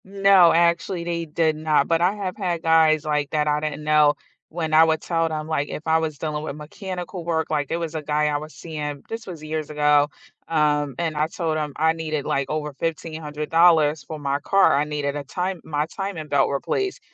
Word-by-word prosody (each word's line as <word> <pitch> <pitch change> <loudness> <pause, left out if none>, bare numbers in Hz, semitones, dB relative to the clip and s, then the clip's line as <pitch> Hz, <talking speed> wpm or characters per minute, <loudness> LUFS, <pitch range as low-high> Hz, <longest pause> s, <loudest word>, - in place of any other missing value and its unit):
No, 195 -2 +5
actually, 170 +1 +1
they 170 -1 -3
did 160 0 0
not, 155 -2 +1
but 165 0 +1
I 185 +4 +2
have 190 -3 -4
had 180 -5 -2
guys, 160 -2 +4
like, 150 -2 0
that 150 -1 +1
I 150 0 +2
didn't 150 -1 -4
know 150 -1 +4 0.3
when 160 -1 -3
I 160 +1 +8
would 160 -1 +2
tell 165 -1 0
them 155 -1 -4
like, 145 -2 -1
if 150 - -6
I 160 0 +4
was 155 -2 -3
dealing 150 0 -3
with 150 -2 -5
mechanical 180 +3 -7
work, 165 -1 -1
like 145 -3 -1
there 165 - -1
was 165 -1 -4
a 155 - -2
guy 150 0 0
I 150 - 0
was 155 +2 -5
seeing, 150 -3 -6
this 225 0 -6
was 170 -4 -8
years 155 0 -4
ago, 150 -1 +3 0.4
um, 150 -3 +1
and 165 -2 -2
I 150 +1 +1
told 165 -1 -2
him 150 -1 -2
I 160 +1 +3
needed 155 -3 -3
like 140 -1 -1
over 150 -1 -3
$1500 155 0 +1
for 155 +2 -7
my 140 -1 -1
car, 195 +6 +4
I 145 - +2
needed 145 -1 -3
a 145 - -4
time 180 +4 -3
my 150 -1 -1
timing 180 -2 -5
belt 140 -2 +2
replaced, 380 - -2
155 Hz, 215 wpm, -23 LUFS, 150-165 Hz, 0.4 s, I